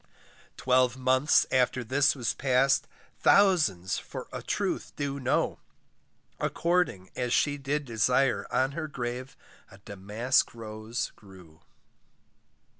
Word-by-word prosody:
Twelve 130 -1 +2
months 130 +3 +3
after 130 0 +1
this 135 +5 +2
was 120 -5 -1
passed, 135 +1 +2 0.3
Thousands 165 - +3
for - - -8
a - - -5
truth - - -3
do 140 -1 -3
know, 130 -1 0 0.8
According 170 - 0
as 125 -1 -2
she 145 +2 +1
did 145 +2 -2
desire, 125 +3 +1
On 130 +1 +1
her 155 +2 -4
grave 125 -1 -5 0.3
a 95 - -15
damask 105 +7 -1
rose 110 +1 -5
grew. 90 -5 -17
130 Hz, 115 wpm, -28 LUFS, 110-140 Hz, 0.8 s, months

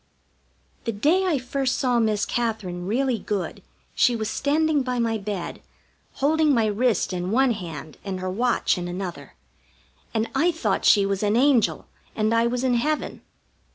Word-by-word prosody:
The 230 - 0
day 315 - +2
I 325 -5 +2
first 260 0 -1
saw 250 -2 +2
Miss 215 -2 +1
Katherine 205 -7 -3
really 250 +2 0
good 195 -3 -4 0.3
she 245 - +3
was 220 -1 -3
standing 300 +1 +1
by 255 -1 -2
my 225 -2 0
bed, 200 -3 -5 0.5
holding 300 +1 +2
my 225 -2 +3
wrist 215 -2 +1
in 180 0 -3
one 255 +4 +3
hand 165 -8 -7
and 190 -2 -4
her 185 - -4
watch 235 -2 +1
in 175 - -4
another, 180 0 -6 0.8
and 225 0 0
I 350 +2 +3
thought 230 - -1
she 200 -1 +6
was 195 -1 -1
an 210 0 +1
angel 255 -2 +3 0.3
and 215 +1 +1
I 230 +1 +3
was 245 +1 -2
in 255 -1 +2
heaven. 300 +6 -1
230 Hz, 165 wpm, -24 LUFS, 200-260 Hz, 0.8 s, she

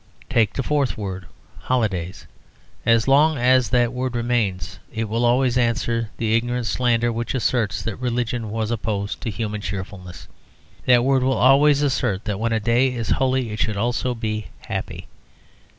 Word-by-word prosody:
Take 115 -5 +2
the 135 - -2
fourth 145 -2 0
word, 95 -4 -5 0.3
"holidays." 100 -8 -2 0.6
As 115 +1 +4
long 150 +3 +4
as 125 0 +3
that 120 -1 +2
word 125 0 -3
remains, 100 -7 -1
it 110 -1 -3
will 115 +3 -1
always 125 +1 +3
answer 115 -1 0
the 110 -1 +1
ignorant 120 +1 -1
slander 120 +2 +1
which 120 +3 -3
asserts 120 -4 0
that 115 - -4
religion 120 -2 -2
was 110 +1 -2
opposed 105 -3 -3
to 120 - -3
human 105 0 -4
cheerfulness; 95 -1 -7 0.6
that 125 -1 +5
word 135 0 +3
will 130 +1 +1
always 140 +3 +5
assert 125 -8 0
that 105 -2 -3
when 115 +1 0
a 115 - +1
day 120 +4 +2
is 115 -2 -4
holy 130 -3 +1
it 105 - -5
should 105 -2 0
also 120 +3 -1
be 110 -2 -3
happy. - - -5
115 Hz, 165 wpm, -22 LUFS, 110-125 Hz, 0.6 s, that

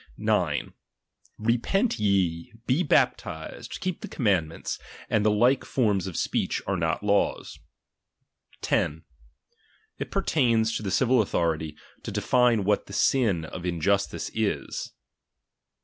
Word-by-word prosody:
9. - - 0 0.6
Repent 120 - +1
ye, 95 -5 +1
be 130 +8 +2
baptized, - - 0
keep 185 -2 -3
the - - -6
commandments, 95 - -1 0.3
and 105 - +3
the 110 - +4
like 120 +6 +3
forms 105 -7 +1
of 90 - -5
speech, - - 0
are 100 - 0
not 80 +1 -1
laws. 100 0 0 1.0
10. 80 +2 0 1.0
It - - -4
pertains 115 -6 +2
to - - -2
the 100 - -3
civil 125 +3 +3
authority, 80 -6 -1 0.2
to - - -6
define 120 -4 +3
what 105 +1 +1
the 100 - -10
sin 105 -8 +2
of 85 - -7
iniustice 90 +3 0
is. 110 -2 -2
105 Hz, 120 wpm, -26 LUFS, 90-120 Hz, 1.0 s, the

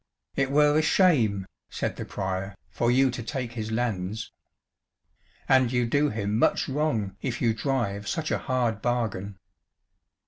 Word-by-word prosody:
"It 140 -1 +1
were 150 +1 +4
a 155 - +4
shame," 125 - +3 0.2
said - - -3
the - - -6
Prior, 95 0 -3 0.2
"for 120 +9 0
you 130 +1 +4
to 120 - -5
take 125 +1 -4
his 110 -2 -4
lands. 110 -2 -2 1.2
And 130 -3 +4
you 125 -1 +2
do 145 +5 +2
him 105 -1 -1
much - - +2
wrong 130 -9 -1
if 125 -3 -3
you 115 -2 +2
drive 110 -5 -2
such 160 -1 -2
a - - +1
hard 120 -5 -1
bargain." 110 -5 -2
120 Hz, 150 wpm, -26 LUFS, 105-135 Hz, 1.2 s, were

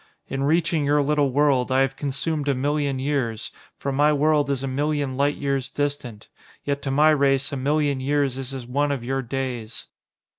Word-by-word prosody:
In 135 - -3
reaching 160 +1 +2
your 145 +1 +3
little 145 -1 +2
world, 135 -2 +2
I 130 +1 +3
have 135 0 0
consumed 145 +2 -2
a 140 - +2
million 145 +1 0
years, 130 -5 -2 0.3
for 140 - -3
my 145 +3 +3
world 150 0 +2
is 135 -1 -1
a - - -2
million 145 0 -1
light 145 +2 +1
years 140 -2 -2
distant: 140 -7 -4 0.4
yet 140 0 -2
to 140 - -3
my 150 +3 +5
race 140 -1 +2
a - - -3
million 145 +1 0
years 140 -1 0
is 135 0 -5
as 130 -3 -6
one 145 +4 0
of 135 -4 -3
your 135 +2 -1
days. 125 -3 -5
140 Hz, 190 wpm, -23 LUFS, 130-145 Hz, 0.4 s, my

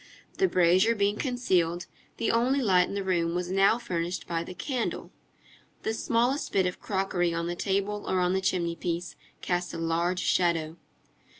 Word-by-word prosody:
The 380 - +4
brazier 185 - +4
being 205 0 +1
concealed, 185 - 0 0.3
the 230 - +1
only 250 +4 +2
light 185 -7 +3
in - - -6
the 200 - -2
room 170 -3 0
was 180 0 -2
now 195 +4 +4
furnished 180 -6 -3
by 165 -1 -2
the 180 - -9
candle; 255 -1 -3 0.7
the 220 - -1
smallest 240 +5 0
bit 190 -2 +2
of 180 - -3
crockery 190 -4 0
on 170 0 -2
the 175 +1 -3
table 200 +2 -1
or 185 - +1
on 180 0 +2
the 190 - +1
chimney 170 -3 0
piece 170 +1 -4 0.3
cast 180 0 -2
a - - -4
large 170 +2 0
shadow. 165 -2 +1
185 Hz, 175 wpm, -28 LUFS, 170-210 Hz, 0.7 s, The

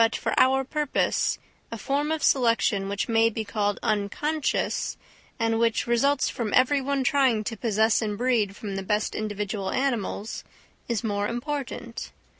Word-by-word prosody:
But, 225 0 +3
for - - -2
our 265 +1 +4
purpose, 295 +1 0 0.3
a 230 - -4
form 285 +7 -1
of 315 -2 -1
selection, 230 -6 +2
which 200 0 -2
may 225 -1 +4
be 220 0 -4
called 205 -1 -1
unconscious, 240 +8 -1 0.4
and 225 -1 +1
which 230 -1 +2
results 260 +4 +2
from 225 -4 -2
every 270 +2 +4
one 275 0 0
trying 255 -5 +3
to 225 +2 -4
possess 220 0 +2
and 210 -2 -2
breed 230 -5 +1
from 200 -3 -5
the - - -2
best 210 +2 -1
individual 205 -2 -3
animals, 235 -5 -2 0.5
is 230 -4 -1
more 205 -2 -1
important. 240 -1 -5
230 Hz, 155 wpm, -26 LUFS, 210-265 Hz, 0.5 s, our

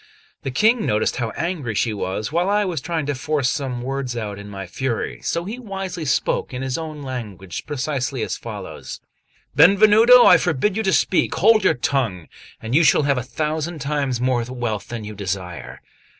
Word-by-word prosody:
The - - -3
King 220 - +3
noticed 105 - 0
how 120 -2 -1
angry 160 - -2
she 110 +2 +1
was, 100 +3 -3
while 175 +4 +1
I 205 0 +2
was 170 -7 -2
trying 165 +1 -2
to 145 - -1
force 140 0 -1
some 130 -5 -3
words 130 -2 -3
out 105 -3 -4
in 100 0 -9
my 95 -1 -6
fury; 110 - -3
so 170 +1 -2
he 225 +6 -6
wisely 190 -7 -5
spoke, 130 -1 0
in 125 - -4
his 130 -1 -2
own 155 -3 -6
language, 105 -9 -6
precisely 135 -3 -2
as - - -2
follows: - - -8 0.6
"Benvenuto, 215 - +7
I 180 - +8
forbid 175 +4 0
you 220 - 0
to 195 -3 +1
speak; 185 -3 +2
hold 215 +5 +4
your - - +4
tongue, 120 - -1 0.3
and 110 +2 -5
you 155 - +5
shall 150 +1 +4
have 140 -2 +2
a - - -2
thousand 155 +6 -3
times 140 -3 -1
more 125 -1 +1
wealth 120 -5 -4
than 120 -2 -6
you 105 0 -7
desire." 95 - -5
135 Hz, 190 wpm, -21 LUFS, 115-170 Hz, 0.6 s, I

